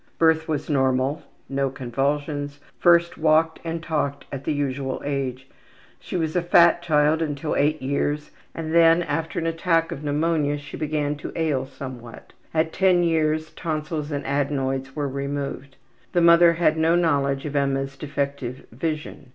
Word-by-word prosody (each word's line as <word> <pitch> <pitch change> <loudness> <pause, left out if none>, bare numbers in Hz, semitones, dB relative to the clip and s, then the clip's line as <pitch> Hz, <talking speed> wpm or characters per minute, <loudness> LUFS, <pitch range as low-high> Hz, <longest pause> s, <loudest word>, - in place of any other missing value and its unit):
Birth 160 -1 +3
was 150 -2 -2
normal. 135 +1 +1 0.3
No 135 0 0
convulsions. 145 +3 -2 0.2
First 170 -1 +4
walked 160 +1 +3
and 165 0 -4
talked 150 -4 -2
at 140 -1 -6
the - - 0
usual 140 -2 -2
age. 135 -2 -3 0.5
She - - -5
was 160 -1 -2
a 180 - +3
fat 170 0 +5
child 155 -1 +2
until 150 -1 -2
8 155 +2 +2
years, 145 +2 -1 0.2
and 160 -1 -4
then, 165 +1 +6
after 160 +1 -3
an 165 - -1
attack 165 0 +1
of 150 -3 -6
pneumonia, 150 0 +1
she 145 0 -9
began 150 -1 -1
to - - -7
ail 150 -6 0
somewhat. 130 -3 -10 0.2
At 160 0 0
10 185 -2 +3
years 155 -1 +1
tonsils 155 -2 -4
and 145 -1 -3
adenoids 135 -1 -1
were 145 -2 -1
removed. 140 0 -4 0.4
The 175 - +3
mother 170 0 +7
had 160 -2 +2
no 160 +1 +3
knowledge 140 -5 +1
of 150 -1 -5
Emma's 135 -1 0
defective 140 -2 -4
vision. 150 +1 -4
150 Hz, 155 wpm, -24 LUFS, 140-160 Hz, 0.5 s, mother